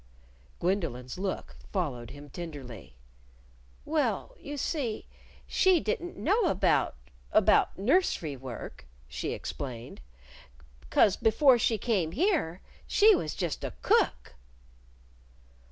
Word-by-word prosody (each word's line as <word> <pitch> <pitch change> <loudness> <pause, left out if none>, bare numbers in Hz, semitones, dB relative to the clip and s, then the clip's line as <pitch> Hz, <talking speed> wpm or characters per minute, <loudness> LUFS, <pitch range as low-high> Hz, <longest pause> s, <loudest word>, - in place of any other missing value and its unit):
Gwendolyn's 165 -8 -2
look 190 -1 -4
followed 135 - -2
him 145 0 -11
tenderly. 135 - -8 0.9
"Well, 320 +10 -1
you 290 0 -7
see, 260 -6 -2 0.4
she 375 -2 +4
didn't 355 -2 -3
know 420 +3 +2
about 190 - +2 0.4
about - - +4
nursery 200 - +1
work," 125 - -8 0.2
she - - -4
explained. 125 -2 -6 0.9
"'Cause 200 - +4
before 245 +3 +4
she 225 0 +2
came 190 -7 0
here 280 - +1 0.3
she 425 +1 +6
was 155 - -3
just 175 -5 -3
a - - -4
cook." - - +2
190 Hz, 105 wpm, -29 LUFS, -, 0.9 s, she